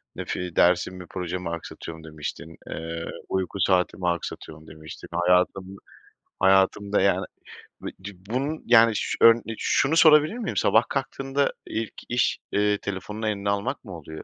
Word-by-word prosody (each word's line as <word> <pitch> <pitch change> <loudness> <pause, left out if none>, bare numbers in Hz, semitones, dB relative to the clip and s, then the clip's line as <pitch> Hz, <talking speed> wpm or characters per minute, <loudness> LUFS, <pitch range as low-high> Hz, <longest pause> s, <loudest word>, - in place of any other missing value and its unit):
Nef - - -4
i 90 -2 -5
dersimi, 90 +1 +2
projemi 90 -1 -4
aksatıyorum." 80 -1 -7
demiştin. 80 +1 -7
Eee, 85 0 -5 0.2
"Uyku 95 +1 -2
saatimi 90 -1 +1
aksatıyorum." 80 -2 -6
demiştin. 80 -1 -11
Hayatımı 90 +2 +1 0.6
hayatımda, 95 +1 +3
yani, 100 +1 +2 0.6
bi - - -5
ci 100 +1 -8 0.2
bunun, 140 +6 -2
yani, 115 -1 +6
şu - - -2
ön 115 0 +8
de 115 -1 -7
şunu 150 +4 +1
sorabilir 155 +6 +6
miyim? 220 -6 -4
Sabah 110 - +4
kalktığında 135 0 -1
ilk 110 0 -4 0.2
iş, 120 0 +1
eee, 105 0 +2
telefonunu 105 +3 -5
eline 100 -1 -1
almak 110 +7 -2
mı 90 -4 -8
oluyor? 80 0 -10
95 Hz, 145 wpm, -25 LUFS, 85-115 Hz, 0.6 s, ön